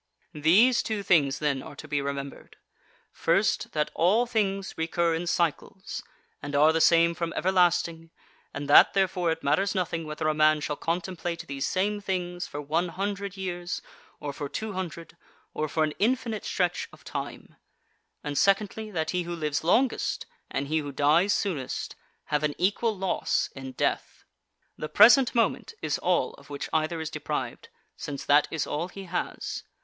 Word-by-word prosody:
These 195 - +5
two 215 -2 -3
things 145 -7 +3
then 145 -3 0
are 145 - -10
to - - -10
be 145 -1 0
remembered: 140 0 -6 0.6
First, 195 +6 +1
that 150 -1 0
all 205 +8 +3
things 195 -5 -1
recur 165 +1 0
in 170 +2 -2
cycles, 170 +3 -2 0.4
and 145 0 -5
are 155 +3 +5
the 165 - +1
same 170 0 +5
from 170 0 -3
everlasting, 175 -3 +1 0.4
and 145 0 -5
that, 145 - +7
therefore, 185 -3 +1
it 165 0 -4
matters 170 +9 +1
nothing 165 -3 -2
whether 150 0 -3
a 155 - +2
man 155 0 +4
shall 150 0 -3
contemplate 170 0 -3
these 140 -2 -3
same 205 +2 0
things 180 -2 -3
for 145 - -6
one 160 +5 0
hundred 200 +2 -4
years, 175 -2 -4 0.4
or 145 -1 -5
for 145 0 -5
two 220 +5 -4
hundred, 170 -3 -6 0.4
or 155 0 -2
for 155 - +1
an 155 -1 -1
infinite 230 -1 0
stretch 180 -1 -1
of - - -17
time: - - -6 0.7
and, 145 -1 -1
secondly, 210 +2 +1
that 160 -6 -2
he 180 - 0
who 175 0 -4
lives 150 -2 -2
longest 240 +9 +1 0.2
and 140 +1 -2
he 155 +2 +1
who 145 -2 -5
dies 155 +8 +3
soonest 160 -13 -2 0.3
have 150 -1 -1
an 150 -1 -1
equal 205 +4 +1
loss 190 -1 0
in 135 -1 -7
death. - - -2 0.6
The 155 - -4
present 240 +4 +7
moment 230 -3 0
is 155 -2 -1
all 175 -7 +1
of 140 - -18
which 145 -1 -5
either 160 +1 0
is 160 0 -4
deprived, - - -4 0.3
since 140 -2 -6
that 145 +1 +5
is 160 - -2
all 155 +4 -2
he 195 +1 -9
has. 180 -1 -4
170 Hz, 170 wpm, -27 LUFS, 150-190 Hz, 0.7 s, that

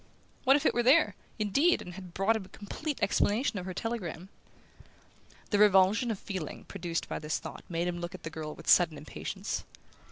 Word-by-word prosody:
What 270 +1 +7
if 290 - 0
it - - +4
were 240 - +2
there, 275 +7 +5 0.2
indeed, 275 - +3
and 180 - -8
had 180 -2 -10
brought 195 +4 +3
him 220 - -3
a - - -16
complete 290 +8 -5
explanation 210 +2 +2
of 180 - -7
her 185 - -4
telegram? 190 -6 -4 1.2
The 205 - +3
revulsion 210 +3 +5
of 220 - -1
feeling 185 -6 -6
produced 175 -4 -4
by - - -3
this 150 0 -1
thought - - -8
made 170 0 -1
him 175 -1 -2
look 175 +1 -5
at 185 - -12
the 165 - -5
girl 155 -1 -6
with 165 - -13
sudden 170 -4 +5
impatience. 150 +1 -5
190 Hz, 195 wpm, -30 LUFS, 175-225 Hz, 1.2 s, What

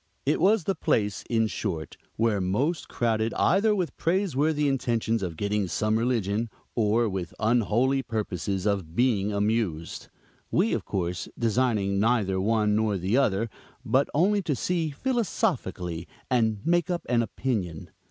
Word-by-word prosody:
It 145 +3 +1
was 200 +1 +4
the 195 - 0
place, 105 - 0
in 115 -1 +2
short, 85 -5 -4 0.2
where 110 -3 +1
most 130 - 0
crowded 115 -1 0
either 210 +4 +3
with 180 -4 -2
praiseworthy 160 -4 +1
intentions 115 -4 0
of 85 -4 -4
getting 105 0 0
some 110 +4 0
religion, 115 -2 0 0.2
or 115 +1 +2
with 95 -4 -4
unholy 120 +4 +2
purposes 100 -5 -3
of 95 -6 -1
being 105 -4 +2
amused; 100 -6 -1 0.4
we, - - +2
of - - -2
course, 90 -2 -3
designing 110 -4 +1
neither 105 -4 +2
one 105 0 +2
nor 110 -2 +1
the 95 +5 0
other, 115 -5 +2 0.4
but 135 +2 +2
only 200 +7 +2
to 155 -6 -1
see 165 +5 -1
philosophically 140 - -2 0.2
and 110 -4 +1
make 175 +1 +2
up 175 -1 -2
an 120 -1 +2
opinion. 105 -9 -3
115 Hz, 145 wpm, -26 LUFS, 100-135 Hz, 0.4 s, was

